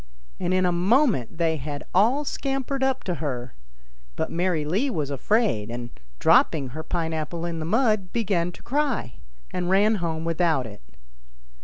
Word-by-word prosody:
And 175 - -1
in 185 0 +3
a 180 - +3
moment 185 - +2
they 165 -1 +1
had 145 +1 -5
all 240 +10 +3
scampered 270 -1 -2
up 265 0 +1
to 180 - -1
her; 125 -5 -3 0.6
but - - -2
Mary 170 -3 0
Lee 200 - +1
was 150 - -2
afraid, 140 - +1
and, 120 0 -6 0.3
dropping 140 - +4
her 155 +6 -6
pine 165 0 -2
apple 165 +2 -3
in 170 -1 -3
the 155 - -3
mud, 215 -3 +2
began 190 -7 0
to - - -15
cry, 265 - -1 0.3
and 180 -1 -2
ran 205 +3 +4
home 160 -1 -2
without 165 -5 +1
it. 105 -2 -10
175 Hz, 165 wpm, -25 LUFS, 155-220 Hz, 0.6 s, dropping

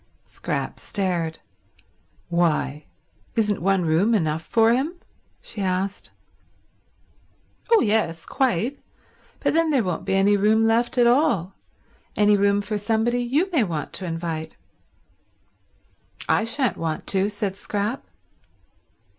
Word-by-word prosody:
Scrap - - -4
stared. 175 -6 -1 0.9
"Why, 165 -4 0 0.5
isn't 210 -5 +1
one 190 -1 +2
room 180 +9 +3
enough 160 -5 0
for 225 +6 +3
him?" 285 +8 -1 0.5
she 215 - -7
asked. 190 +1 -2 1.6
"Oh 460 - +6
yes, 205 -7 0
quite. 255 +1 0 0.6
But - - +1
then 330 0 +2
there 270 -6 +2
won't 180 -3 -3
be 190 - 0
any 200 +2 +4
room 215 +2 +3
left 230 +3 +1
at 240 - +5
all— 235 - +2 0.6
any 210 0 +4
room 200 0 +2
for 210 0 -3
somebody 225 +3 0
you 290 +11 0
may 300 -9 +3
want 165 -7 -4
to 190 - -5
invite." 165 -1 -4 1.7
"I 225 - +2
shan't 230 - 0
want 160 -1 -3
to," 195 +1 +1
said 205 -2 -3
Scrap. 205 +4 -3
205 Hz, 120 wpm, -23 LUFS, 180-235 Hz, 1.7 s, Oh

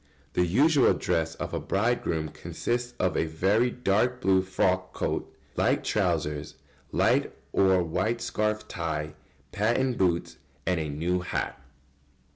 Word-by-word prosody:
] 70 +1 -34
The 90 - +2
usual 140 - +4
dress 80 0 -1
of - - -5
a - - 0
bridegroom 95 -7 0
consists 120 +9 -3
of 90 -2 +1
a - - +2
very 100 +10 +2
dark 125 +1 +1
blue 95 -5 +3
frock 95 0 0
coat, - - -2 0.2
light - - +2
trousers, 75 -1 -1 0.4
light - - +2 0.2
or 95 -2 +4
white 95 +8 -1
scarf 110 -2 -1
tie, 75 -3 -3 0.4
patent 120 +4 +1
boots, 85 -7 +1 0.3
and 90 -2 +1
a 80 -1 -3
new 85 +5 0
hat. 90 -6 -3
95 Hz, 135 wpm, -27 LUFS, 80-115 Hz, 0.4 s, usual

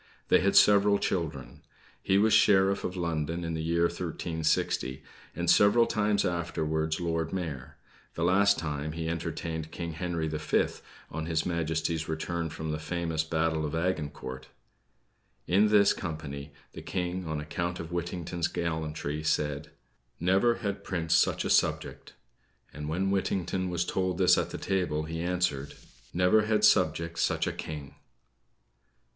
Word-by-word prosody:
They - - +6
had 100 +1 +1
several 100 0 +6
children. 75 -11 -3 0.4
He 95 - +2
was 110 +2 +4
Sheriff 100 -3 +4
of 95 - -4
London 85 0 -2
in 85 0 -3
the 80 - -2
year 85 +1 +1
1360, 80 -5 -1 0.3
and 85 0 -3
several 105 +6 +6
times 105 -2 +1
afterwards 80 -2 -1
Lord 80 -2 -1
Mayor; 80 -9 -5 0.4
the 85 - -2
last 100 +3 +4
time, 75 -1 -3
he 80 0 -4
entertained 80 -1 -4
King 85 0 -5
Henry 85 -1 -2
the 75 -1 -3
Fifth, 75 - 0 0.3
on 80 +1 -4
his 80 -1 0
Majesty's 80 -1 -1
return 80 +1 -2
from 80 +1 -5
the 75 - -3
famous 80 0 -2
Battle 80 -1 0
of 75 +1 -3
Agincourt. 75 -7 -3 1.0
In 100 +4 +4
this 105 -1 +5
company, 75 -5 -6 0.2
the - - -8
King, 90 -1 -3
on 80 -1 -2
account 85 +4 -3
of 80 0 -7
Whittington's 85 -1 -2
gallantry, 80 -3 -3
said: 75 -1 -1 0.5
"Never 95 +7 +3
had 100 0 -2
prince 85 -4 -1
such - - +3
a - - -1
subject;" - - 0 0.6
and 75 0 -6
when 95 +4 0
Whittington 95 -1 -1
was 90 0 -1
told 95 -1 -1
this 90 -1 +5
at - - -1
the - - -5
table, 90 -6 -1
he 80 +1 -4
answered: 85 -6 -1 0.4
"Never 90 +5 +3
had 110 -1 +2
subject 85 0 +2
such - - +1
a - - -1
king." 75 -3 -7
85 Hz, 150 wpm, -29 LUFS, 80-90 Hz, 1.0 s, They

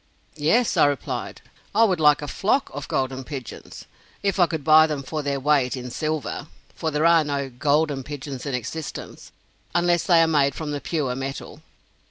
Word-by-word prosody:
"Yes," 165 +11 +2
I - - +6
replied, 145 -4 -4 0.3
"I 225 - +6
would 190 -6 +2
like 150 -1 +4
a - - -4
flock 215 - 0
of 145 0 -6
'golden 130 0 -2
pigeons,' 130 -3 -8 0.4
if 200 -1 0
I 175 - +6
could 160 -3 -4
buy 155 +1 +7
them 150 -3 -3
for 155 +3 -4
their 140 -1 -2
weight 135 -2 +2
in 125 -1 -7
silver; 155 +2 -3 0.3
for 160 - -3
there 150 +1 0
are 170 -1 +6
no 140 -2 -3
'golden' 145 +2 +1
pigeons 140 -1 -7
in 135 - -1
existence, 135 +6 -7 0.4
unless 175 -1 +3
they 170 -3 +5
are - - +2
made 140 -4 +2
from 155 -2 -4
the 145 -1 -3
pure 145 -7 -2
metal." 135 +1 -6
150 Hz, 185 wpm, -23 LUFS, 135-160 Hz, 0.4 s, buy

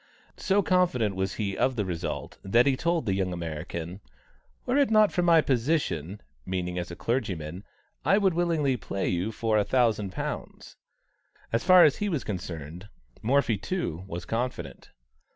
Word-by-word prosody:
So 200 +1 +2
confident 150 - +2
was 95 0 -2
he 100 -3 -2
of 130 0 +1
the 105 -4 -1
result, 85 -2 -4
that 115 +6 +3
he 140 -2 +3
told 170 0 0
the 100 - +1
young 95 -1 -1
American: 85 +1 -5 0.7
"Were 250 +2 +1
it 280 - +3
not 215 -2 +5
for 180 - 0
my 170 -2 +5
position 120 - -1 0.2
(meaning 90 +1 -3
as 85 - -5
a 85 - -7
clergyman), 95 -7 -3 0.4
I 195 - +4
would 195 -3 +3
willingly 160 -6 +1
play 100 -2 -3
you 90 +4 -1
for 110 -1 +1
a - - +3
thousand 110 -5 +1
pounds." - - -6 0.8
As 115 - +1
far 185 -1 +8
as 145 - +4
he 205 - -1
was 155 -9 -1
concerned, 90 -1 -6 0.3
Morphy, 120 -2 +2
too, 105 - -3
was 90 -1 -6
confident. 115 - -4
110 Hz, 165 wpm, -27 LUFS, -, 0.8 s, far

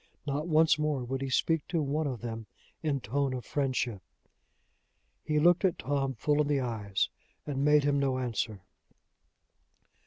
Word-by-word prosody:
Not 145 +2 -2
once 160 -1 +4
more 150 -4 0
would 130 +2 -3
he 135 - -2
speak 160 +4 +1
to 170 - 0
one 150 +2 0
of 125 -5 -4
them 115 -2 -5 0.3
in 145 -4 -1
tone 135 +4 -1
of 125 - -6
friendship! 130 -7 -1 1.2
He 150 - 0
looked 175 +5 +5
at 185 -3 +2
Tom 135 -1 -1
full 150 +6 +2
in 150 - 0
the 145 -1 +2
eyes, 110 -6 -1 0.4
and 140 -2 -2
made 150 0 +5
him 140 0 +2
no 135 -2 +1
answer. 115 -5 -2
140 Hz, 160 wpm, -30 LUFS, 125-150 Hz, 1.2 s, looked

